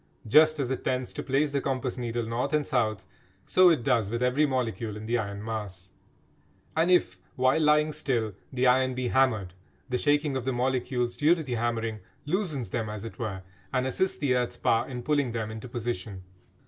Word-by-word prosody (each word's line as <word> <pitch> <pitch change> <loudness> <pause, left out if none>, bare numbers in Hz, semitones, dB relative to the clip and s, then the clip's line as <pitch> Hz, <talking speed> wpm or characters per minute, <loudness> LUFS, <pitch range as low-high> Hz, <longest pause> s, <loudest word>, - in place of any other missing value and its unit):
Just 155 +7 +5
as 135 -2 -1
it 130 - -3
tends 130 -1 -2
to 145 - -4
place 140 +1 +1
the 140 -1 0
compass 130 -2 -2
needle 120 -1 -2
north 125 +5 -2
and 150 -1 +2
south, 110 -4 0 0.4
so 185 -1 +6
it 155 -8 +2
does 115 -6 +2
with 120 +2 -2
every 135 +5 +3
molecule 115 -4 -2
in 105 - -8
the 120 +2 +1
iron 100 -1 -5
mass. 100 -4 -5 0.8
And 165 +3 +2
if, 95 - +3 0.2
while 130 +5 +3
lying 150 0 +4
still, 115 -8 -1 0.2
the 130 -1 0
iron 130 0 +3
be 125 -1 -1
hammered, 110 -9 +2 0.4
the 125 -1 0
shaking 145 -1 +2
of 130 - -2
the 130 +1 -1
molecules 125 -1 -1
due 155 +4 +4
to 165 - -5
the 130 -4 -4
hammering 115 -2 -1 0.3
loosens 150 - -1
them 110 -3 -2
as 105 0 -6
it 115 - -9
were 100 -6 -4 0.3
and 130 -1 0
assists 185 +9 0
the 140 -3 +1
earth's 125 -1 -1
power 115 - +1
in 125 -2 -5
pulling 140 -4 +1
them 110 -2 -3
into 110 +3 -8
position. 110 -5 -4
125 Hz, 200 wpm, -27 LUFS, 115-140 Hz, 0.8 s, so